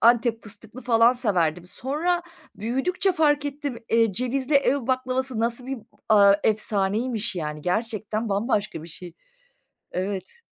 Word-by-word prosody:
Antep 235 0 +4
fıstıklı 215 +4 -9
falan 230 0 +5
severdim. 180 - 0
Sonra 315 - -1 0.3
büyüdükçe 270 - 0
fark 295 -4 +2
ettim, 285 -3 -4
eee, 225 -2 +3
cevizli 255 +6 -1
ev 280 -2 +3
baklavası 255 -1 -1
nasıl 235 +2 -1
bir, 270 -1 -3 0.3
aaa, 200 -2 +7
efsaneymiş, 215 +2 +1
yani? 150 -2 -4
Gerçekten 215 +3 -2
bambaşka 205 -4 -1
bir 165 - -10
şey. 175 +1 -9 0.8
Evet. 190 - -4
230 Hz, 125 wpm, -25 LUFS, 200-260 Hz, 0.8 s, aaa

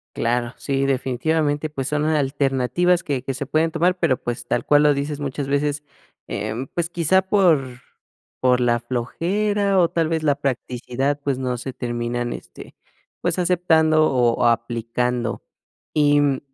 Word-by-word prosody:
Claro, 120 +1 -1
sí, 135 -1 -1
definitivamente, 145 +4 0
pues 135 -3 -4
son 150 0 0
alternativas 145 +3 +1
que 140 -4 -2
que 135 - -3
se 140 - -4
pueden 155 +4 +1
tomar, 180 +3 +1
pero, 130 - +2
pues, 120 0 -5
tal - - -1
cual 145 0 +5
lo 150 -1 +5
dices 145 +1 -3
muchas 140 -1 -4
veces, 145 +1 0 0.4
em, 110 +5 -4
pues 170 -1 -3
quizá 175 +2 +2
por 180 -9 +3 0.7
por 125 -1 +3
la 120 -1 +2
flojera, 195 - -1
o, 170 -2 +4
tal 165 -2 0
vez 160 -1 -1
la 145 -2 +3
practicidad, 135 +1 -2
pues, 140 -2 0
no 125 -2 -2
se 130 +2 -6
terminan, 120 -1 -3
este, - - -11 0.5
pues - - 0
aceptando, 160 -4 +3
o, 120 -1 +2
aplicando. 115 0 -1 0.5
Y, 145 -1 +4
mm, 140 -2 +1
140 Hz, 150 wpm, -22 LUFS, 125-160 Hz, 0.7 s, cual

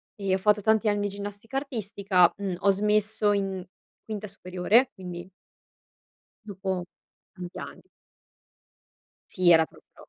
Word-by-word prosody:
E 195 -2 -1
ho 190 - +3
fatto 210 +1 +3
tanti 220 +1 +3
anni 205 0 +1
di 205 - 0
ginnastica 205 +5 -6
artistica, 200 -8 +2
uhm, 195 -3 -3
ho 200 - +3
smesso 210 +1 +2
in 195 -2 -2 0.4
quinta 210 -1 -5
superiore 190 +8 +2
quindi 180 -2 -8 1.2
dopo 190 -2 -3 0.5
tanti 180 -2 -8
anni. - - -9 1.5
Sì, 180 -2 +3
era 160 -1 +6
proprio. - - -19
200 Hz, 125 wpm, -27 LUFS, 185-210 Hz, 1.5 s, era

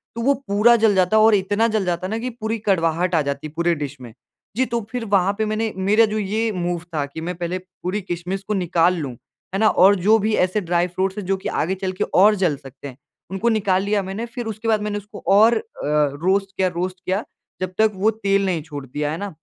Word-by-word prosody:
तो 230 - -3
वो 280 +4 +3
पूरा 210 +4 +5
जल 220 -3 +3
जाता 185 +3 +3
है 215 - +6
और 220 -1 +6
इतना 205 +4 +1
जल 215 -4 0
जाता 175 +1 -2
न 220 +3 -3
कि 250 +2 -3
पूरी 225 -2 -4
कड़वाहट 175 -3 +1
आ 160 - +3
जाती 140 +2 -3
है 150 - -14
पूरे 170 +1 +2
डिश 145 -2 -5
में। 120 -3 -10 0.4
जी, 260 - +3
तो 235 -2 -2
फिर 245 -2 -3
वहाँ 200 -1 +2
पे 220 - 0
मैंने 215 +1 -1
मेरा 205 +4 +4
जो - - -1
ये 215 +2 -1
मूव 175 -3 -2
था 145 -2 0
कि 145 +3 -8
मैं 175 +1 -4
पहले 175 +1 -3
पूरी 185 +2 -5
किशमिश 180 +1 -4
को 215 - 0
निकाल 180 -2 +2
लूँ, 140 -5 -4 0.4
है 195 - -1
ना, 220 - +4
और 195 +2 +5
जो 205 +4 +4
भी 215 +1 0
ऐसे 185 +3 +1
ड्राई 175 0 +1
फ्रूट्स 190 +2 -2
है 210 - -3
जो 195 +1 0
कि 190 - -5
आगे 185 +5 -1
चल 190 0 -3
के - - +5
और 210 +3 +6
जल 180 -6 +1
सकते 135 0 -11
हैं, 130 -1 -11 0.3
उनको 195 +5 0
निकाल 195 -4 +1
लिया 205 0 +1
मैंने, 195 +5 -4
फिर 240 0 -7
उसके 220 +1 -5
बाद 215 -2 +2
मैंने 210 0 -2
उसको 205 0 -10
और 215 +4 +6
अ, - - -2 0.6
रोस्ट 195 +1 +1
किया, 190 - +2
रोस्ट 180 +1 -3
किया, 190 +4 -1 0.4
जब 185 0 -3
तक 220 0 +4
वो 210 +4 +2
तेल 200 -2 0
नहीं 175 -4 -1
छोड़ 145 -3 -8
दिया, 150 +3 -3
है 160 - -3
ना, 205 +3 -4
195 Hz, 250 wpm, -21 LUFS, 175-215 Hz, 0.6 s, है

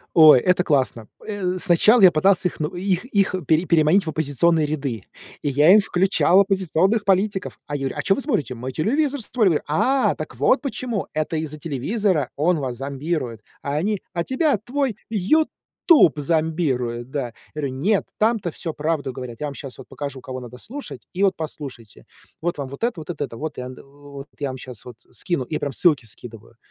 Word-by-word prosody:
Ой, 155 -6 +9
это 180 0 +2
классно! 130 -8 0 0.2
Э, 190 -4 -2
сначала 200 +6 +4
я 180 -3 +9
пытался 180 +3 +3
их - - -13
ну 150 - 0
их 185 +2 -1
их 200 -6 +1
пере 160 +3 +3
переманить 170 +3 +3
в 160 - -2
оппозиционные 155 +1 +1
ряды, 135 -9 -3 0.4
и 145 - -2
я 145 +6 +5
им 215 - +8
включал 190 0 +3
оппозиционных 195 +2 +1
политиков. 195 0 0
А 145 - -3
я 135 -1 -2
говорю: - - -7
"А - - -2
чё 195 - +3
вы - - -3
смотрите?"- 205 - -1
"Мы 130 +3 -6
телевизор 280 - 0
смотрим". 205 -9 +2
"А-а, 255 - +2
так - - -7
вот - - +3
почему! 250 -6 -3
Это 155 +1 -1
из-за 155 -1 -4
телевизора! 160 - -1
Он 165 +3 +2
вас 130 -3 -3
зомбирует". 135 -3 -3 0.2
А 140 +1 -2
они: 200 +5 -1
"А 170 -2 -1
тебя 260 - +1
твой 255 0 -2
"Ютуб" 250 - +3
зомбирует", 140 -6 -1
да. 130 -5 -3 0.2
Говорю: 145 -2 -2
"Нет. 185 +11 +1
Там-то 215 -5 +1
всё 165 0 -6
правду 150 -4 -2
говорят. 125 -1 -8
Я 150 - -2
вам 140 - -5
щас 135 -2 -8
вот 130 - -12
покажу, 140 -2 -6
кого 130 0 -7
надо 125 0 -10
слушать. 275 - -8
И 190 - -1
вот 195 -1 +4
послушайте. 130 - -8 0.4
Вот 170 -3 -2
вам 135 -2 -4
вот 140 - -5
это, 230 -9 -1
вот 155 - -10
это 160 -4 -3
это, 115 -3 -8
вот 155 -1 -5
вот 140 +2 -10
я 140 -2 -2
вам 130 0 -6
щас 125 -4 -10
вот 125 - -10 0.2
скину". 170 -8 -2
И 155 - -4
прям 145 - -3
ссылки 145 -3 +2
скидываю. 115 0 -11
155 Hz, 190 wpm, -22 LUFS, 135-195 Hz, 0.4 s, Ой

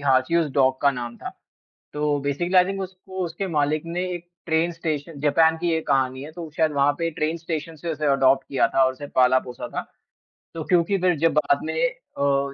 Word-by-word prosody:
हाँची 135 +3 +2
उस 160 -3 +1
डॉग 130 -1 +2
का 140 - +5
नाम 120 -3 -6
था। - - -7 0.7
तो 150 -1 0
बेसिकली 175 +7 0
आई 180 - +8
थिंक 195 +1 -3
उसको 185 0 -6
उसके 170 +4 -4
मालिक 150 -1 0
ने 175 +2 -2
एक 175 0 -9 0.2
ट्रेन 165 +1 +1
स्टेशन 155 -2 -4
जापान 160 +2 +4
की 170 0 -1
ये 160 - +1
कहानी 130 -1 +1
है, 155 - -9
तो 165 -1 -8
शायद 160 -2 +3
वहाँ 140 0 +3
पे 165 0 0
ट्रेन 155 +2 -2
स्टेशन 165 -1 -5
से 165 +2 -4
उसे 155 0 -3
अडॉप्ट 135 0 +3
किया 135 - +2
था 135 - +3
और 130 - +2
उसे 145 +2 -8
पाला-पोसा 130 -1 +2
था। - - 0 0.7
तो 165 - -4
क्योंकि 180 +4 +2
फिर 180 -3 +2
जब 165 0 +2
बाद 145 -2 +2
में - - -3
अ, 140 - -2
155 Hz, 210 wpm, -24 LUFS, 140-170 Hz, 0.7 s, आई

